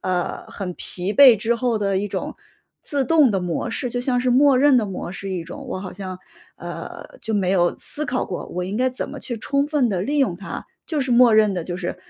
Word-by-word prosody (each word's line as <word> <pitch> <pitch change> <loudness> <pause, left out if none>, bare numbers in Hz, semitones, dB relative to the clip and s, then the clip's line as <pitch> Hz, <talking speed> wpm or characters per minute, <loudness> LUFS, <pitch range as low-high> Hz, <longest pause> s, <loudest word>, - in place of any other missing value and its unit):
呃， 180 -1 -2
很 190 -3 -5
疲 185 +3 -3
惫 260 -4 +8
之 225 +4 0
后 240 -1 0
的 195 -2 0
一 205 +1 -2
种 - - -4 0.5
自 280 -2 -1
动 305 -6 +5
的 195 - +1
模 180 +5 -2
式， 250 +1 -2
就 245 - -2
像 250 0 +1
是 250 0 +1
默 270 +1 +5
认 275 -2 +5
的 215 - 0
模 185 -2 -5
式 195 0 -6
一 180 -3 -3
种。 280 - -9
我 190 - -3
好 185 -1 -7
像， 185 -1 -7 0.4
呃， - - -8
就 220 -1 -3
没 190 -3 +1
有 175 -2 +2
思 300 +1 -4
考 250 +1 -1
过， 180 - -5
我 180 +1 -4
应 200 +5 -3
该 255 - +3
怎 255 - -4
么 - - -8
去 240 - -5
充 280 +5 0
分 290 -6 +1
地 185 - -1
利 280 +11 -1
用 265 -11 +2
它。 195 +3 -7 0.2
就 310 -3 -2
是 260 -2 0
默 240 -1 +6
认 215 -3 +4
地 175 - -2
就 175 +1 -5
是 180 -1 -4
220 Hz, 265 characters per minute, -22 LUFS, 185-255 Hz, 0.5 s, 惫